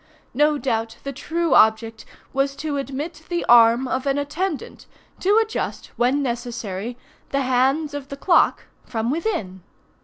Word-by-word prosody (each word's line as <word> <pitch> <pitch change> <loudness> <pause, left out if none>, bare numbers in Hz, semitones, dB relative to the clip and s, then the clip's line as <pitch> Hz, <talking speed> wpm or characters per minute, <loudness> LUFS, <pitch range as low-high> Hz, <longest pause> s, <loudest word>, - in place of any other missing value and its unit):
No 295 +3 +3
doubt 225 -5 -2
the 275 - -4
true 330 +5 -1
object 220 0 +3 0.3
was 275 +1 0
to 295 -1 -3
admit 290 +4 -5
the 345 -1 -1
arm 235 +2 +6
of 260 +2 -2
an 275 0 +1
attendant, 310 +3 -4 0.3
to 405 +3 +3
adjust, 445 0 -2
when 260 +4 +1
necessary, 235 -3 -4 0.3
the 275 - 0
hands 270 +4 +1
of 285 -2 -6
the 280 - -6
clock 345 +5 +3 0.2
from 230 0 -2
within. 230 - -3
275 Hz, 145 wpm, -22 LUFS, 235-300 Hz, 0.3 s, arm